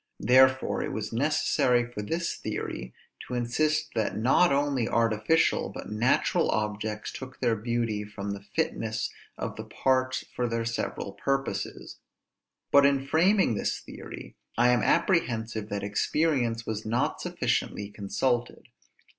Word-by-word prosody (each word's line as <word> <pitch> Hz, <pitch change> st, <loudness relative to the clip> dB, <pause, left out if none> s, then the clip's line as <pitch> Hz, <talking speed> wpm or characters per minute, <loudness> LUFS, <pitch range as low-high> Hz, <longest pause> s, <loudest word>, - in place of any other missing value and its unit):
Therefore 130 Hz, +1 st, +5 dB
it -, -, -3 dB
was 110 Hz, 0 st, -4 dB
necessary 125 Hz, -2 st, +2 dB
for 120 Hz, -3 st, -6 dB
this 165 Hz, +10 st, -2 dB
theory 60 Hz, -, -5 dB, 0.4 s
to 125 Hz, -, -4 dB
insist 155 Hz, +6 st, 0 dB
that 110 Hz, -2 st, -1 dB
not 130 Hz, +10 st, +4 dB
only 140 Hz, -4 st, +1 dB
artificial, 115 Hz, +8 st, +2 dB
but -, -, -8 dB
natural 115 Hz, +4 st, +2 dB
objects 105 Hz, 0 st, -2 dB
took 130 Hz, 0 st, -9 dB
their 120 Hz, -3 st, +2 dB
beauty 115 Hz, -1 st, -1 dB
from 100 Hz, -1 st, -6 dB
the 100 Hz, 0 st, -5 dB
fitness 110 Hz, +2 st, -2 dB, 0.3 s
of -, -, -4 dB
the -, -, -5 dB
parts 130 Hz, -1 st, 0 dB
for 125 Hz, -, 0 dB
their 115 Hz, 0 st, -1 dB
several 115 Hz, -3 st, -3 dB
purposes. 135 Hz, -7 st, -3 dB, 0.7 s
But 140 Hz, -, +7 dB
in 140 Hz, -1 st, +3 dB
framing 175 Hz, -, +3 dB
this 105 Hz, -, -1 dB
theory, -, -, -10 dB, 0.2 s
I 120 Hz, +1 st, +5 dB
am 125 Hz, -2 st, +4 dB
apprehensive 115 Hz, -, +1 dB
that 100 Hz, 0 st, -3 dB
experience 115 Hz, +2 st, 0 dB
was 110 Hz, -1 st, -3 dB
not 115 Hz, +3 st, -1 dB
sufficiently 100 Hz, 0 st, -1 dB
consulted. 120 Hz, +4 st, -2 dB
120 Hz, 135 wpm, -28 LUFS, 110-135 Hz, 0.7 s, But